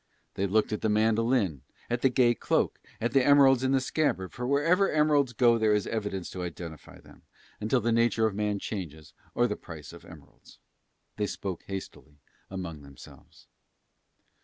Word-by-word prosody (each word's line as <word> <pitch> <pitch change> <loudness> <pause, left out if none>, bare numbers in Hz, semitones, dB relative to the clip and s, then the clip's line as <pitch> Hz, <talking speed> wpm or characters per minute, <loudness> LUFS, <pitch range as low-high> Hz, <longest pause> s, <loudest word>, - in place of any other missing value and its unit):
They 100 - -1
looked 110 +2 +1
at 105 - -3
the 110 - +1
mandolin, 110 - +1 0.3
at 120 0 -2
the 135 - +4
gay 125 -1 +3
cloak, 115 - 0 0.2
at 115 +1 -1
the 135 - +4
emeralds 135 -2 +6
in 130 - +1
the 135 - +3
scabbard, 130 - -1
for 125 0 -4
wherever 165 +8 +3
emeralds 150 -4 +3
go 120 0 +3
there 110 -1 +3
is 105 - 0
evidence 105 -5 -4
to 90 - -6
identify 85 -3 -8
them, - - -18 0.4
until 110 +4 +1
the 115 +2 0
nature 115 -1 +2
of 110 - 0
man 105 0 -1
changes 80 -8 -7 0.2
or 120 - +3
the 105 -4 -1
price 80 -4 -11
of - - -13
emeralds. - - -16 0.6
They 105 -1 0
spoke 95 -2 -5
hastily 95 -6 -8 0.3
among 85 -5 -6
themselves. 70 -2 -16
110 Hz, 170 wpm, -28 LUFS, 95-125 Hz, 0.6 s, emeralds